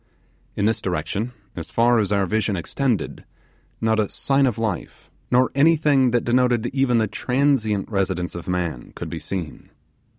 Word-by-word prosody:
In 100 - 0
this 110 0 +1
direction, 100 +5 -2 0.2
as 80 -1 -6
far 115 +7 +3
as 105 -2 0
our 100 -1 +2
vision 105 +1 0
extended, 115 - -2 0.6
not 110 -1 +1
a 105 - +1
sign 135 0 +2
of 120 -3 -1
life, 110 -6 -4 0.2
nor 125 +1 +3
anything 145 -3 +4
that 120 0 0
denoted 120 -1 +2
even 135 -3 +2
the 110 - +3
transient 125 -3 0
residence 95 -4 -1
of 85 +1 -8
man, 90 -8 -3
could - - -6
be 85 - -4
seen. 85 +1 -6
110 Hz, 160 wpm, -22 LUFS, 95-125 Hz, 0.6 s, anything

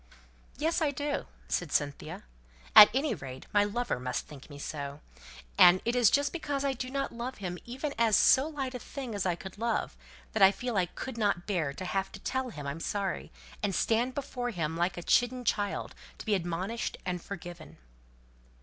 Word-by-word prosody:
"Yes, 325 +4 +1
I 310 - +3
do," 285 +1 -2 0.2
said 175 -5 -1
Cynthia. 145 -1 -2 0.5
"At 210 - +12
any 275 +4 +1
rate, 130 -1 -8
my 205 -1 +5
lover 210 - -1
must 125 0 -3
think 145 -1 -12
me 145 - -9
so. 145 0 -5 0.6
And 175 +1 +9
it 235 +2 +1
is 240 -4 +6
just 285 0 +2
because 290 -4 -2
I 275 - +1
do 255 0 -5
not 275 +1 -2
love 240 +2 -5
him 180 -3 -5
even 265 +4 -4
as 225 -3 +5
so 265 +3 +5
light 275 -4 -4
a 250 - -4
thing 255 0 -6
as 200 -2 -1
I 175 - +1
could 190 +3 -10
love, 230 -1 -1 0.4
that 220 - -1
I 195 0 +9
feel 245 +4 -4
that 200 - +2
I 180 - +2
couldn't 205 -5 -2
bear 170 -8 0
to 185 +6 -6
have 195 +1 -1
to 200 - -8
tell 260 +4 -2
him 150 -10 -8
I'm 140 +3 -4
sorry, 195 +2 -2 0.3
and 200 -3 0
stand 240 +3 +1
before 250 -3 -3
him 165 -7 -2
like 175 +2 0
a 175 - -5
chidden 245 +4 +2
child 205 -2 -1 0.2
to - - -9
be 215 - +1
admonished 185 +5 -2
and 180 -1 -2
forgiven." 175 - -9
205 Hz, 195 wpm, -30 LUFS, 175-255 Hz, 0.6 s, At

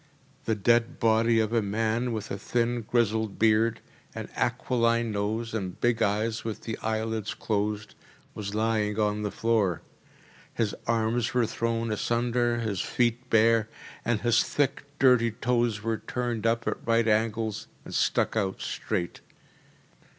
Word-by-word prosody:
The 110 - +1
dead 115 +3 +2
body 115 +1 +3
of 110 +1 0
a 115 - +3
man, 110 +4 0
with 110 -2 -4
a 100 - -2
thin 120 +3 0
grizzled 110 -2 0
beard, 110 +1 +3 0.3
an - - -6
aquiline 115 -2 +1
nose, 110 +3 -2
and 95 -5 -4
big 120 -1 +1
eyes 110 +3 0
with 110 -2 -4
the 110 - -4
eyelids 110 0 -2
closed, 105 -1 -2 0.4
was 105 -1 -5
lying 110 -1 0
on 105 0 +1
the 105 - -1
floor. 105 -6 0 0.7
His 110 -3 0
arms 115 +1 0
were 125 -2 +4
thrown 115 0 -1
asunder, 120 +2 +1
his 105 -5 -1
feet 120 +1 0
bare, 115 0 +4 0.3
and 115 -2 0
his 120 -1 +3
thick, 140 0 -1
dirty 125 -4 +5
toes 120 -2 0
were 115 0 -1
turned 120 -3 -2
up 115 0 0
at - - 0
right 115 0 +2
angles 110 0 0 0.2
and - - -9
stuck - - +1
out 95 -3 -1
straight. 85 - -3
115 Hz, 145 wpm, -27 LUFS, 110-115 Hz, 0.7 s, dirty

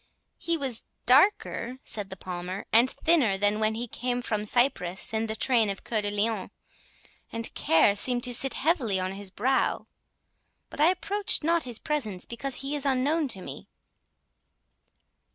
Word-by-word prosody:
"He 335 -1 -1
was 265 -6 -1 0.2
darker," 260 - +3
said 205 -3 -5
the 190 - -6
Palmer, 180 +2 -6
"and 235 +3 +5
thinner, 270 -14 +2
than 205 +2 +2
when 220 0 +1
he 240 +2 -4
came 245 +2 -3
from 210 -2 -2
Cyprus 210 -6 0
in 220 +1 -1
the 220 - -3
train 230 -3 +2
of 195 - -5
Cœur 220 -2 -1
de 205 - -2
Lion, 205 0 -1 0.8
and 230 0 -3
care 160 +5 +3
seemed 245 +3 +1
to 250 - +1
sit 265 +2 +3
heavy 265 - +1
on 185 0 -2
his 195 0 -7
brow; 255 +8 0 0.9
but - - -5
I 315 - +6
approached 390 0 0
not 335 -1 +2
his 240 -3 -2
presence, 220 -13 -3
because 260 +3 -2
he 285 +2 -2
is 290 - +1
unknown 285 +3 +1
to 190 -7 -2
me." - - -9
235 Hz, 165 wpm, -27 LUFS, 205-275 Hz, 0.9 s, I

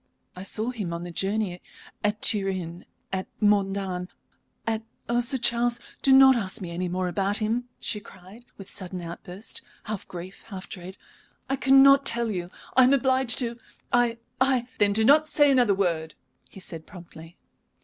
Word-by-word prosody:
"I 180 - -8
saw 220 +5 -3
him 205 -9 -4
on 170 0 -5
the 175 - -7
journey, 195 0 -2 0.4
at 210 +1 -1
Turin, 190 -5 +2 0.3
at 190 0 -2
Modane, 195 -3 0 0.6
at 225 -1 -1 0.3
Oh, 235 +1 +1
Sir 255 +3 +2
Charles, 240 0 +1 0.2
do 270 - +4
not 265 0 +8
ask 195 -5 -1
me 180 -3 -6
any 180 +2 -3
more 185 +1 -1
about 195 +3 0
him!" 225 +3 -1
she 210 - -3
cried, 195 +3 -15
with 195 - -10
a - - -9
sudden 185 -2 -5
outburst, 180 +4 -6 0.2
half 215 -3 -5
grief, 180 +2 -9
half 195 -4 -8
dread. 185 0 -9 0.5
"I - - +3
cannot 275 +1 +6
tell 235 -3 0
you 175 -3 -4 0.3
I 260 - +7
am 260 - +4
obliged 260 -1 +2
to 235 -1 -3 0.3
I 240 -1 +3 0.2
I 260 -2 +2
" - - -27
"Then 205 -1 +4
do 220 +1 +2
not 300 +4 +5
say 290 -2 +4
another 245 -7 +4
word," 165 -5 -1 0.3
he - - -12
said, 165 -4 -6
promptly. 170 -2 -13
205 Hz, 175 wpm, -26 LUFS, 185-240 Hz, 0.6 s, not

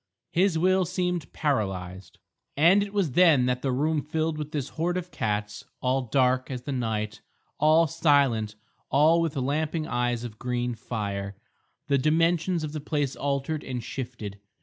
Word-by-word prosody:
His 180 -1 +2
will 185 +3 +3
seemed 180 -2 -2
paralysed. 95 - -2 0.4
And 175 +7 +6
it 200 0 -3
was 200 -8 0
then 160 -6 +5
that 125 0 0
the 135 - 0
room 150 +4 +1
filled 155 +2 -1
with 150 0 -5
this 140 -3 -3
horde 175 +3 -1
of 180 0 -5
cats, 105 0 -2 0.2
all 130 +1 +1
dark 130 -1 +2
as 125 -2 -5
the 140 - -4
night, 110 -4 -2 0.4
all 155 +2 +5
silent, 140 -9 +2 0.3
all 155 +5 +4
with 165 -3 -1
lamping 150 +4 -1
eyes 120 -2 -1
of 110 -3 -8
green 125 0 -1
fire. 100 -4 -4 0.5
The 140 -2 +2
dimensions 165 +3 +2
of 150 - -3
the 155 -1 -5
place 145 -2 -1
altered 140 +2 -2
and 125 -2 -4
shifted. 120 -5 -6
140 Hz, 160 wpm, -26 LUFS, 120-160 Hz, 0.5 s, And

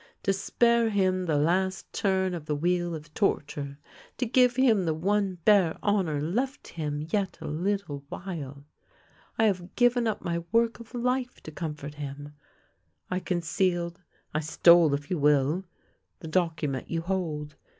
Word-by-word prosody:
To 195 - +2
spare 235 +4 +2
him 185 -3 +1
the 155 -2 +2
last 185 +4 0
turn 190 -2 +1
of 160 -3 -6
the 150 - 0
wheel 175 +2 0
of 155 0 -10
torture, 145 -7 -1 0.4
to 250 - 0
give 250 +1 +4
him 230 -8 +4
the 160 -1 0
one 195 +3 0
bare 195 -6 +5
honour 190 -8 +1
left 240 - -2
him 150 -2 -3
yet 200 -3 0
a - - -8
little 165 -2 -2
while, 145 -7 -7 0.7
I 225 - +3
have 185 -4 0
given 245 -1 +3
up 215 -2 -2
my 170 -2 -1
work 230 +1 +2
of 235 +1 -11
life 250 +1 -1
to 155 - -8
comfort 150 -3 -5
him; 145 0 -7 0.8
I 180 - 0
concealed 175 0 -1 0.2
— - - -40
I 155 - +1
stole, 160 0 +5
if 145 +3 -7
you 180 - 0
will 150 +5 +2 0.3
— - - -47
the 160 - -7
document 155 -5 -1
you 165 -1 -1
hold. 160 -5 -3
175 Hz, 160 wpm, -28 LUFS, 150-200 Hz, 0.8 s, bare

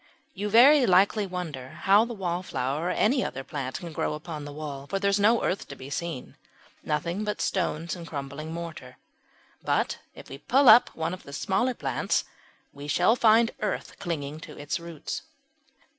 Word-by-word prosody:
You 205 +2 -3
very 255 +4 +7
likely 195 +3 +4
wonder 160 -8 -5
how 205 +3 +6
the 235 0 -6
Wallflower 170 -5 -2
or - - 0
any 255 +8 +2
other 135 - -4
plant 135 -2 -4
can 170 -3 -8
grow 150 - -1
upon 155 -1 -7
the 145 - -7
wall, 145 -2 -7
for 195 - -1
there 200 0 +1
is 200 - +2
no 225 +3 +4
earth 190 - -1
to 140 - -8
be 135 +1 -10
seen 165 -3 -5 0.5
nothing 170 +6 -2
but 210 0 -3
stones 170 -3 -1
and 170 -2 -9
crumbling 140 +1 -6
mortar. 165 -6 -7 0.6
But - - 0 0.2
if - - -12
we 135 - -9
pull 265 - +3
up 230 +3 +8
one 160 +2 -2
of 185 - -7
the 140 - -12
smaller 235 - 0
plants - - 0 0.5
we 140 +1 -9
shall 180 +9 +3
find 230 -1 +5
earth 210 -2 -3
clinging 155 -3 -4
to 155 -1 -11
its 145 +5 -3
roots. 170 -3 -6
170 Hz, 180 wpm, -27 LUFS, 145-205 Hz, 0.6 s, up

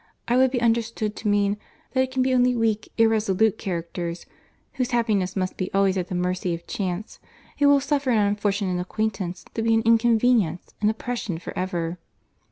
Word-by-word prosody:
I 240 - +2
would 260 +1 +5
be 250 -1 -1
understood 230 -2 0
to 220 - -4
mean, 205 0 +2 0.3
that 260 - +3
it 260 - 0
can 260 0 0
be 260 0 +1
only 250 0 +3
weak, 220 -2 0
irresolute 220 -2 +2
characters, 170 -2 -4 0.5
(whose 255 -2 -1
happiness 215 -7 0
must 185 -1 -2
be 185 - -3
always 195 -1 +3
at 180 -2 -2
the 180 - -4
mercy 180 0 -1
of 170 - -11
chance,) 190 +1 -4 0.4
who 285 - +5
will 285 0 +6
suffer 280 -1 -1
an 235 - +3
unfortunate 200 -3 0
acquaintance 190 -2 -3
to 225 - -2
be 225 0 +3
an 225 - +2
inconvenience, 230 -6 +3
an 210 - +3
oppression 220 -4 -3
for 170 - -8
ever." 175 -2 -2
210 Hz, 180 wpm, -24 LUFS, 185-235 Hz, 0.5 s, will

